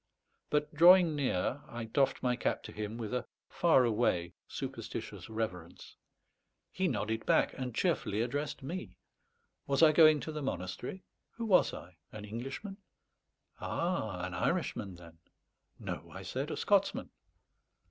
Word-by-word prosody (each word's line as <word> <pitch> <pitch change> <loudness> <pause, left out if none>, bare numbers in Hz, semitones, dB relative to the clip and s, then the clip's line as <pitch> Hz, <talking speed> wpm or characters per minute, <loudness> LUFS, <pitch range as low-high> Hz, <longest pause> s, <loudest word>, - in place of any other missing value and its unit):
But 150 +1 0
drawing 170 0 +7
near, 135 -1 0
I 120 0 -6
doffed 135 +5 +1
my 125 -1 +2
cap 120 - -1
to - - -8
him 105 +1 -5
with 115 -1 -5
a 125 - -2 0.2
far 160 -7 +4
away 105 -7 +1
superstitious - - -6
reverence. 110 -5 -5 0.8
He 185 0 0
nodded 110 -5 -1
back, - - +3
and 125 -3 -5
cheerfully 135 - +1
addressed 140 +4 -3
me. 180 +7 -6 0.7
Was 140 +3 +3
I 155 - +8
going 155 -1 +7
to 155 - -5
the 150 -1 -4
monastery? 125 - -4 0.3
Who 230 - -4
was 190 -5 +5
I? 90 -1 -10
An 105 -1 -8
Englishman? 135 - -6 0.8
Ah, 110 - -2
an 95 - -6
Irishman, 95 +2 -1
then? 85 -1 -14 0.6
"No," - - -6
I - - -9
said, - - -3
"a - - -3
Scotsman." - - +1
125 Hz, 140 wpm, -32 LUFS, 105-155 Hz, 0.8 s, I